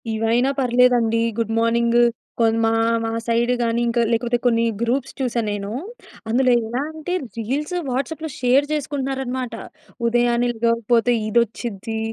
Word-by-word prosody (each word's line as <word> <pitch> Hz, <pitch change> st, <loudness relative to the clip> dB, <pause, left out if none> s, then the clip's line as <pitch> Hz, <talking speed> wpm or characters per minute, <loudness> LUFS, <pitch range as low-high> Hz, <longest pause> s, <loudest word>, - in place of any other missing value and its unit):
ఇవైనా 230 Hz, +4 st, +2 dB
పర్లేదండి. 245 Hz, -2 st, +3 dB, 0.2 s
Good 225 Hz, -1 st, -1 dB
morning 235 Hz, +1 st, +3 dB, 0.4 s
కొ 230 Hz, -, +4 dB, 0.2 s
మా 225 Hz, -, +2 dB, 0.3 s
మా 225 Hz, -, -2 dB
సైడ్ 235 Hz, +1 st, +1 dB
గాని 230 Hz, 0 st, 0 dB
ఇంక 235 Hz, +1 st, 0 dB
లేకపోతే 240 Hz, +1 st, +1 dB
కొన్ని 230 Hz, -1 st, +3 dB, 0.2 s
గ్రూప్స్ 250 Hz, +3 st, -1 dB
చూసా 245 Hz, -3 st, -1 dB
నేను. 205 Hz, 0 st, -4 dB, 0.6 s
అందులో 255 Hz, +3 st, +3 dB, 0.2 s
ఎలా 240 Hz, +4 st, -2 dB
అంటే 315 Hz, +3 st, -5 dB, 0.2 s
రీల్స్, 280 Hz, +9 st, -2 dB
వాట్సాప్‌లో 295 Hz, +5 st, -3 dB
షేర్ 260 Hz, +3 st, +3 dB
చేసుకుంటున్నారు 275 Hz, -2 st, -2 dB
అన్నమాట. 250 Hz, -2 st, -4 dB, 0.5 s
ఉదయాన్నే 240 Hz, +1 st, +2 dB
లేగపోతే 230 Hz, +1 st, +2 dB
ఇదోచ్చిద్ది, 225 Hz, -1 st, -1 dB
240 Hz, 130 wpm, -21 LUFS, 230-255 Hz, 0.6 s, కొ